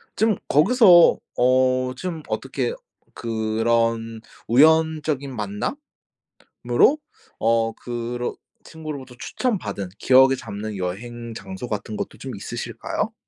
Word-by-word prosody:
좀 220 0 +2
거기서 180 - +6 0.2
어 130 0 +2
좀 165 +3 -5
어떻게 - - -2 0.4
그런 115 0 -1 0.3
우연적인 155 0 +3
만남으로 105 - -5 1.4
어 115 0 +2
그러 120 +1 -4 0.3
친구로부터 150 -5 -8
추천받은 190 - -3
기억에 130 +1 +5
잡는 105 -3 -6
여행 115 +6 -5
장소 95 +3 -7
같은 105 0 -4
것도 - - -5
좀 - - -7
있으실까요? - - -4
120 Hz, 225 characters per minute, -23 LUFS, 115-155 Hz, 1.4 s, 거기서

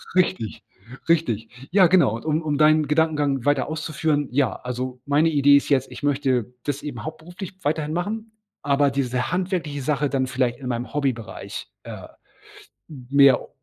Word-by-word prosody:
Richtig. 180 - 0 0.5
Richtig 125 -5 -1
Ja, 185 -2 +6
genau. 165 - +4
Und 115 - -8
um 155 +1 +1
um 150 -2 -1
deinen 155 -1 +4
Gedankengang 150 -4 +1
weiter 145 -2 +2
auszuführen, 155 -1 -1
ja, 135 -3 +1
also 125 0 -5
meine 150 +3 +3
Idee 145 -1 +5
ist 140 - -2
jetzt, 135 -2 +1
ich - - -9
möchte 130 -5 0
das 145 -1 -3
eben 135 -5 -6
hauptberuflich 175 +5 -8
weiterhin 155 +1 -1
machen, 215 +5 -3 0.3
aber 140 0 +3
diese 125 -1 -1
handwerkliche 180 -6 -2
Sache 145 +1 0
dann 135 -2 0
vielleicht 125 -2 -1
in 130 - -7
meinem 120 +2 -4
Hobbybereich, 130 -6 -3 0.2
äh, - - -9 0.8
m 130 -5 -11
mehr 140 -2 +5
145 Hz, 160 wpm, -23 LUFS, 130-155 Hz, 0.8 s, Ja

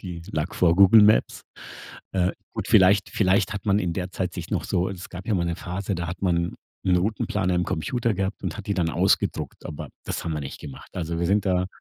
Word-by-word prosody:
die 85 -3 -7
lag 80 +2 -2
vor 85 -2 +4
Google 100 +3 +8
Maps. 105 +1 +3 0.7
Äh, 90 -1 +1 0.2
gut, - - -4
vielleicht 95 +2 +5
vielleicht 100 +2 +2
hat 100 -1 -6
man 100 0 +3
in 90 -4 -1
der 90 +1 -4
Zeit 90 -1 -3
sich - - -6
noch - - -1
so 90 +1 0
es 95 -3 -7
gab 90 +1 -8
ja 110 - +1
mal 85 - +1
'ne 85 0 -2
Phase, 95 +3 -4
da 85 -1 -3
hat 90 +2 -6
man 85 -2 +1 0.3
'n 90 -1 +4
Routenplaner 95 -1 0
am 90 0 +1
Computer 115 +9 -1
gehabt 95 +1 -3
und - - -3
hat 105 - -8
die 100 - 0
dann 85 -4 0
ausgedruckt, - - 0
aber 75 - -7 0.2
das - - -4
haben 85 - -2
wir 75 - -3
nicht 70 - -7
gemacht. 70 -3 -10
Also, 85 -1 -3
wir 85 - +1
sind 100 +2 +2
da 90 -1 +2
90 Hz, 235 wpm, -25 LUFS, 85-100 Hz, 0.7 s, Google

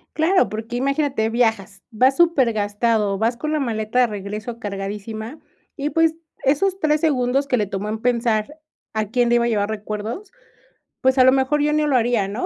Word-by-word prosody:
Claro, 360 +4 +3
porque 225 +3 -6
imagínate, 275 -3 0
viajas, 220 -4 0
vas 255 +4 +2
supergastado, 225 - +2
vas 225 +4 0
con 305 +6 -4
la 310 - 0
maleta 225 -3 -2
de - - +5
regreso 210 +3 -6
cargadísima, 210 +5 -6 0.4
y, 285 0 -2
pues, 325 +2 +2 0.3
esos 365 +8 +1
3 305 -2 +1
segundos 275 -2 +1
que 255 - +1
le 210 - +1
tomó 195 +1 -4
en 220 0 -3
pensar 235 +3 0 0.3
a 215 -1 -1
quién 240 +1 +1
le 240 - +3
iba 235 0 +3
a - - +1
llevar 210 -3 0
recuerdos, 215 - -5 0.7
pues, 260 +1 +2
a - - +8
lo 260 - +6
mejor 270 +2 +1
yo 300 - +2
ni 305 0 +2
lo 290 -3 +1
haría, 235 -4 +2
¿no? 210 +5 -3
240 Hz, 190 wpm, -21 LUFS, 215-275 Hz, 0.7 s, a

